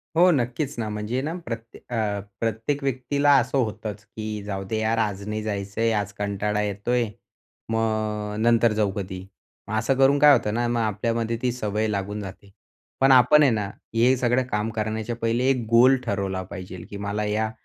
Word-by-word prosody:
हो, 175 +3 +6
नक्कीच 135 +1 -1
ना, 110 - -2
म्हणजे 105 +5 -2
ना 155 +4 -3
प्रत्ये 115 0 -7 0.2
अ, 105 -2 0 0.2
प्रत्येक 115 +6 -2
व्यक्तीला 140 +2 +1
असं 125 +2 +1
होतंच 110 -3 -3
की 110 -1 -6
जाऊदे 100 +1 -4
यार. 110 +1 +1
आज 100 -2 -1
नाही 105 0 -2
जायचंय. 105 +2 -1
आज 105 -1 -2
कंटाळा 105 +1 -1
येतोय. 105 +4 0 0.6
मग 110 -2 -1
नंतर 115 0 +4
जाऊ 105 -2 +1
कधी. 95 -2 -5 0.5
मग 110 - -5
असं 125 +5 +1
करून 135 +1 +4
काय 145 0 +8
होतं 105 - +1
ना, 120 +1 0
मग 120 0 0
आपल्यामध्ये 115 +2 -1
ती 125 - +1
सवय 110 -2 -1
लागून 105 0 -3
जाते. 100 +1 -10 0.5
पण 135 0 +5
आपण 130 +4 +7
आहे 140 - +5
ना, 105 -2 0 0.3
हे 120 +3 +4
सगळं 125 +1 +2
काम 105 +1 0
करण्याच्या 110 +1 -2
पहिले 120 +3 +1
एक 125 -4 +1
गोल 120 +3 +6
ठरवला 95 -2 -2
पाहिजेल, 90 -2 -8
की 100 - -7
मला 100 +1 -2
या 110 +1 0
110 Hz, 175 wpm, -24 LUFS, 105-120 Hz, 0.6 s, काय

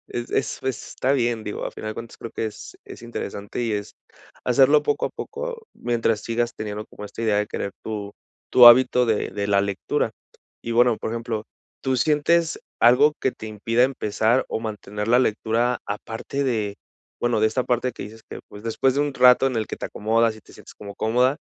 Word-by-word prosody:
es 120 0 -5
es - - -1
es 130 -2 -3
está 130 +2 0
bien, 120 -4 0
digo, 105 - -4
a - - -3
final 110 - -6
de - - -6
cuentas, 115 +1 -9
creo 115 - -8
que 110 - -2
es 105 - -9
es - - -11
interesante 105 -1 -5
y 115 - -1
es 105 0 -5 0.5
hacerlo 135 +4 +5
poco 470 +3 0
a - - -6
poco 465 0 -6
mientras 115 -2 0
sigas 120 +1 -1
teniendo 105 0 -5
como 105 - -10
esta 105 - -7
idea 110 -2 +2
de 105 - 0
querer 100 - -4
tu 105 -2 -5 0.4
tu 125 -1 +9
hábito 125 0 +7
de 110 -2 0
de 100 -1 -3
la 100 -1 +3
lectura, 100 -1 -1 0.5
y, 115 - -3
bueno, 120 -1 +4
por - - -4
ejemplo, 115 -2 -3 0.4
¿tú 130 -1 0
sientes 160 +4 +2 0.2
algo 125 +6 +6
que 130 - +1
te 110 - -9
impida 115 +3 0
empezar 120 -1 +1
o - - -3
mantener 105 -1 -5
la 120 +2 +5
lectura? 115 +1 +1
Aparte 110 +6 -4
de, 110 -6 -1 0.4
bueno, 120 -3 +1
de 110 - +5
esta 125 +3 -1
parte 125 +1 0
que - - -8
dices 110 +2 -12
que, - - -7
pues, 105 +1 -11
después 125 +3 +1
de 140 - +1
un 145 -1 0
rato 125 +1 +6
en 130 -3 -1
el 110 - -1
que - - -5
te - - -5
acomodas 110 +1 +1
y - - -14
te - - -19
sientes - - -14
como 100 -1 -10
cómoda, 125 +7 +2
115 Hz, 210 wpm, -23 LUFS, 110-125 Hz, 0.5 s, tu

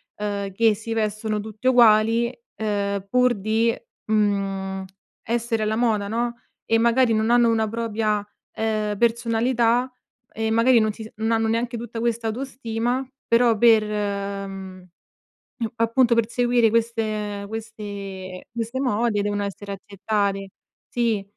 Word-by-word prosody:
uhm, 205 -1 -3
che 225 +2 +4
si 220 +2 -5
vestono 215 -1 -1
tutte 220 +3 -5
uguali, 230 -1 +5 0.2
ehm, 200 -2 -2
pur 250 +2 +4
di, 220 +2 +1 0.3
mhmm, 195 -2 0 0.4
essere 230 -1 -1
alla 215 +1 0
moda 220 -3 +1
no, 235 +2 -1 0.3
e 225 - +3
magari 235 +1 +3
non 220 +1 +1
hanno 240 -1 +5
una 220 -1 +2
propria 215 -2 -1 0.3
ehm, 215 -2 -1
personalità 235 +2 +2 0.4
e 220 0 -2
magari 230 +2 +5
non 215 -1 +2
si 225 - -11
se 220 - -10
non 220 +1 -1
hanno 225 -1 +2
neanche 235 +2 -1
tutta 230 0 -6
questa 230 -1 -1
autostima, 245 +1 -2 0.2
però 230 -1 +4
per 225 -1 +6
mhmm, 200 -2 -4 0.9
appunto 235 +1 +3
per 230 -1 +2
seguire 240 -1 +3
queste 215 -3 -1
questi 200 -4 -7
queste 235 +2 -3
mode 230 -4 +1
devono 205 0 -1
essere 200 0 -5
accettate 200 0 -2 0.4
Sì. 230 -4 0
220 Hz, 130 wpm, -23 LUFS, 205-235 Hz, 0.9 s, per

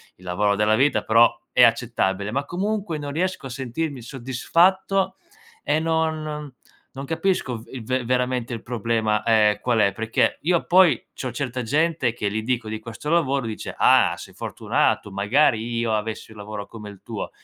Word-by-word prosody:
il 90 - -21
lavoro 100 +3 +1
della 105 +1 +3
vita, 140 +4 +2
però 115 +1 +4
è 125 - +5
accettabile, 110 -4 +1
ma 140 +4 -1
comunque 195 -2 -2
non 145 -1 -5
riesco 175 -2 -2
a - - -9
sentirmi 135 +2 -4
soddisfatto 175 - +1 0.5
e 155 - +1
non 155 -3 -2 0.4
non 135 +1 -7
capisco 160 -6 -1
v - - -13
il 130 -3 -7
ve 130 0 -1
veramente 125 0 -1
il 115 -2 -5
problema, 110 -2 0
ehm, 110 -2 +3
qual 120 -2 +1
è, 100 -2 +3
perché 115 +2 0
io, 170 +1 +1
poi, 175 -7 +5 0.2
c'ho 130 - -5
certa 125 0 -3
gente 145 0 +1
che 105 -4 -2
gli 110 +1 -2
dico 120 -1 -2
di 110 0 -4
questo 115 +6 -7
lavoro, 140 -6 +1
dice: 110 -1 -6
"Ah! - - +5
Sei - - -11
fortunato! 105 - -1
Magari 115 +3 +1
io 115 -1 0
avessi 110 +1 -3
un 110 - -14
lavoro 105 0 -6
come 105 -1 -10
il 100 -2 -13
tuo!", - - -5
125 Hz, 175 wpm, -23 LUFS, 110-150 Hz, 0.5 s, è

